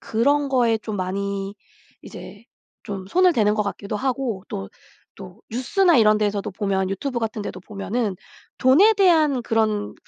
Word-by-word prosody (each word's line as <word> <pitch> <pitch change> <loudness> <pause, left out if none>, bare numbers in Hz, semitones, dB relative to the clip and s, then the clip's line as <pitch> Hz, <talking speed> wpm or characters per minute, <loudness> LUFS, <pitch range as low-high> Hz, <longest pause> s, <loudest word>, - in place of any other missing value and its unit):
그런 280 +6 +1
거에 240 -4 +2
좀 215 -1 -6
많이 195 +1 -3 0.5
이제 205 +2 -11 0.4
좀 195 -2 -6
손을 365 - +3
대는 210 -7 +2
것 215 - 0
같기도 200 0 -5
하고 250 -5 -2
또, 95 0 -6 0.5
또 65 - -12
뉴스나 325 - +2
이런 215 -2 +4
데에서도 205 0 -1
보면 190 -1 -1
유튜브 240 +6 -3
같은 220 -1 -3
데도 185 - -6
보면은 205 +2 -3 0.4
돈에 315 +13 +5
대한 320 - +3
그런 215 -2 -1
215 Hz, 290 characters per minute, -22 LUFS, 200-260 Hz, 0.5 s, 돈에